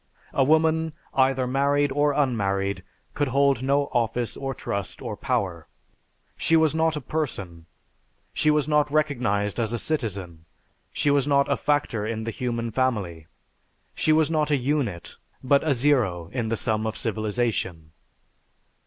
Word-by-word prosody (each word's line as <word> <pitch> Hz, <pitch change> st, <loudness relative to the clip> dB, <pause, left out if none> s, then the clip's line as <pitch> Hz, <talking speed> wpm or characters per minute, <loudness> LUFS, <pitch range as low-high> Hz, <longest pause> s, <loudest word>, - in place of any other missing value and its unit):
A 135 Hz, -, +3 dB
woman, 160 Hz, +2 st, +2 dB, 0.2 s
either 130 Hz, -1 st, +2 dB
married 140 Hz, +2 st, +1 dB
or 145 Hz, +2 st, +2 dB
unmarried, 100 Hz, -8 st, 0 dB, 0.3 s
could 145 Hz, -1 st, 0 dB
hold 140 Hz, -1 st, +2 dB
no 140 Hz, +2 st, +2 dB
office 120 Hz, 0 st, 0 dB
or 135 Hz, -1 st, -4 dB
trust 100 Hz, -3 st, -4 dB
or -, -, -5 dB
power. 85 Hz, -4 st, -2 dB, 0.7 s
She 165 Hz, -, +2 dB
was 160 Hz, -2 st, +4 dB
not 160 Hz, 0 st, +1 dB
a 150 Hz, -, -4 dB
person. 100 Hz, -, -4 dB, 0.7 s
She 155 Hz, -, +2 dB
was 150 Hz, -2 st, +2 dB
not 150 Hz, -1 st, +2 dB
recognized 125 Hz, -9 st, 0 dB
as 115 Hz, -2 st, 0 dB
a -, -, 0 dB
citizen. 100 Hz, -, -3 dB, 0.5 s
She 145 Hz, -, +1 dB
was 140 Hz, -1 st, +2 dB
not 140 Hz, -1 st, +3 dB
a -, -, +4 dB
factor 145 Hz, -8 st, 0 dB
in 110 Hz, +1 st, -3 dB
the 115 Hz, -, -3 dB
human 115 Hz, -1 st, -3 dB
family. 105 Hz, -11 st, -1 dB, 0.7 s
She 155 Hz, -, +1 dB
was 155 Hz, 0 st, +3 dB
not 155 Hz, -2 st, +1 dB
a 145 Hz, -, +3 dB
unit, 125 Hz, -, -2 dB, 0.3 s
but 140 Hz, +2 st, +3 dB
a 150 Hz, -3 st, +2 dB
zero 115 Hz, -, +1 dB
in 120 Hz, -4 st, -2 dB
the 115 Hz, -, 0 dB
sum 110 Hz, -1 st, -1 dB
of 110 Hz, -, -4 dB
civilization.... 110 Hz, -7 st, -2 dB
130 Hz, 155 wpm, -25 LUFS, 105-145 Hz, 0.7 s, was